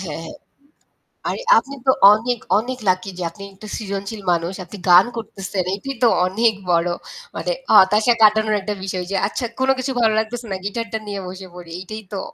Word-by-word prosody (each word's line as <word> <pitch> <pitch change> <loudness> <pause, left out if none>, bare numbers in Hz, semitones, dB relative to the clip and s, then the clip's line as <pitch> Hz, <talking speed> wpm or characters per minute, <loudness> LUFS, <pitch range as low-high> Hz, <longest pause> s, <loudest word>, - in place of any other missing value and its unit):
হ্যাঁ, 165 -4 -5
হ্যাঁ। - - -9 0.9
আরে - - -3 0.2
আপনি 270 +5 -2
তো - - +8 0.2
অনেক, 235 +2 -1 0.2
অনেক 255 +3 -4
লাকি 185 +1 0
যে 180 - -4
আপনি 200 - -12
একটা 210 +3 -12
সৃজনশীল 200 0 -5
মানুষ 170 +2 0
আপনি 205 - -10
গান 175 +2 +8
করতেছেন 195 -4 -4
এটাই 275 +7 -6
তো - - +7 0.2
অনেক 220 +4 +2 0.2
বড় 170 0 +2 0.5
মানে - - -2 0.2
হতাশা 210 +5 +6
কাটানোর 215 0 +5
একটা 210 +2 -3
বিষয় 185 -2 -3
যে 195 - -1
আচ্ছা, 240 +4 -3
কোন 260 - +1
কিছু 260 +1 -2
ভালো 220 -1 +4
লাগতেছে 235 +2 -4
না 190 - -1
গিটার 230 +2 -3
টা - - +1
নিয়ে 200 -1 -4
বসে 185 +1 -8
পড়ি 175 -1 -11
এইটাই 215 +4 -7
তো 195 - -2
205 Hz, 190 wpm, -20 LUFS, 190-225 Hz, 0.9 s, তো